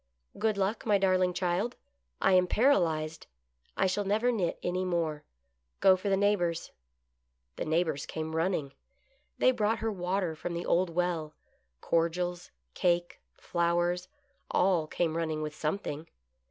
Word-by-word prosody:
" 60 - -19
Good 215 -1 +1
Luck, 200 +3 0
my 210 -3 +3
darling 185 -2 +3
child! 180 +6 -1 0.4
I - - +3
am 180 0 +5
paralyzed. 165 - +1 0.5
I - - +3
shall 190 +2 +1
never 215 +5 +2
knit 190 -8 -1
any 180 +1 -1
more. 165 -4 -1 0.6
Go 190 - +6
for 185 +2 -3
the 195 - +3
neighbors." 180 -5 +1 0.8
The - - -3
neighbors 160 -2 0
came 160 0 -4
running. 160 -5 0 0.6
They 255 - +5
brought 220 -2 +1
her 225 0 -1
water 180 -3 -1
from 170 +2 -5
the 170 - -3
old 180 +1 +2
well 165 -3 -1 0.2
— 60 +1 -46
cordials, 175 +1 0 0.2
cake, 175 -1 0 0.2
flowers 175 +1 0 0.2
— - - -43
all 180 -4 +2
came 165 0 -1
running 160 -2 -1
with 150 0 -4
something. 155 0 -3
175 Hz, 150 wpm, -30 LUFS, 160-195 Hz, 0.8 s, Go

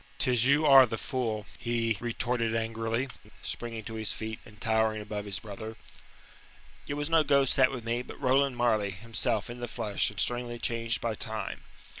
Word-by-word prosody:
"Tis 125 -2 +4
you 150 +3 +4
are 135 -3 +9
the 115 - -3
fool," 115 -6 -2
he 115 -1 0
retorted 115 -1 0
angrily, 115 +2 -1 0.4
springing 115 -2 -4
to 115 - -7
his 110 -1 0
feet, 110 0 -5
and 105 -2 -15
towering 110 -1 +1
above 105 -1 -5
his 100 -2 -3
brother. 110 +1 -7 1.1
"It 145 - -2
was 145 0 -1
no 165 -1 +5
ghost 140 -3 +3
sat 130 -1 +5
with 125 -4 -5
me, 120 +1 -1
but - - -10
Roland 135 -1 +2
Marleigh, 110 -4 +2
himself, 105 +1 -1
in 120 +1 -8
the 120 - -4
flesh, 110 -3 -1
and 105 - -9
strangely 120 -1 0
changed 115 0 0
by 115 -1 -1
time. 110 -2 -5
115 Hz, 180 wpm, -29 LUFS, 110-125 Hz, 1.1 s, are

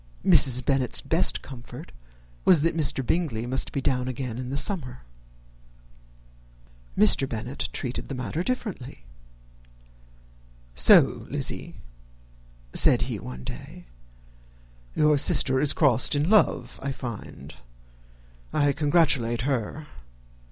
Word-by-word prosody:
Mrs. 130 -8 +4
Bennet's 135 -3 0
best 165 +3 +1
comfort 125 -3 -11 0.5
was, 170 -6 +4
that 165 0 0
Mr. 140 -4 0
Bingley 125 -8 -2
must 130 +2 -3
be 140 - -3
down 125 -1 -1
again 125 -2 -5
in 125 -1 -6
the 140 - -3
summer. 140 -4 -1 1.9
Mr. 135 +5 +5
Bennet 120 +4 -5
treated 125 -2 -5
the 135 - -6
matter 130 +6 -4
differently. 180 - -6 1.7
"So, - - +5
Lizzy," - - -6 1.0
said - - +3
he, - - -5
one 65 0 -9
day, - - -10 1.1
"your 150 -1 +2
sister 130 -1 +4
is 145 +1 +1
crossed 130 -3 +3
in 150 +6 0
love, 215 - +1
I 140 - -4
find. 115 - -9 1.0
I 145 -1 +1
congratulate 145 -6 0
her. 135 +2 -3
135 Hz, 110 wpm, -24 LUFS, 125-150 Hz, 1.9 s, Mr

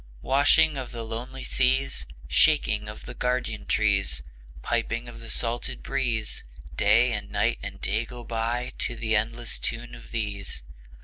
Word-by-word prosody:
Washing 145 +3 +5
of 130 -2 -4
the 115 -1 -4
lonely 120 +4 -5
seas, 135 +1 +1 0.2
Shaking - - +4
of - - -9
the - - -6
guardian 125 -4 -1
trees, 100 -10 +2 0.4
Piping 115 0 0
of 120 - -9
the 115 0 -8
salted 120 0 -2
breeze; 120 -5 0 0.3
Day 115 - +5
and 105 -1 -4
Night - - +1
and - - -6
Day 110 +4 0
go 120 0 -8
by 115 +2 -1
To 120 - -1
the 110 -1 0
endless 115 +2 -1
tune 120 +1 -3
of 120 - -11
these. 105 -3 -3
115 Hz, 150 wpm, -27 LUFS, 110-125 Hz, 0.4 s, Washing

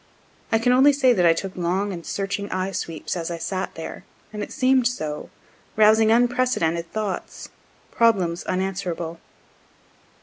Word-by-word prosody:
I 225 - +4
can 240 +2 +2
only 275 +3 +6
say 265 -3 +4
that 180 -6 +3
I 165 - +6
took 190 +3 -5
long 185 +3 -1
and 170 -2 -7
searching 195 +2 -3
eyesweeps 185 -4 -3
as 170 -1 -3
I 170 - -4
sat 185 +3 -4
there, 160 - -7 0.3
and 210 - -5
it - - -5
seem'd 260 -3 +3
so, 155 -11 -4 0.5
rousing 220 +1 +5
unprecedented 235 -9 +1
thoughts, 215 -3 -4 0.4
problems 190 -7 +2
unanswerable. 180 -3 -3
195 Hz, 140 wpm, -23 LUFS, 170-230 Hz, 0.5 s, only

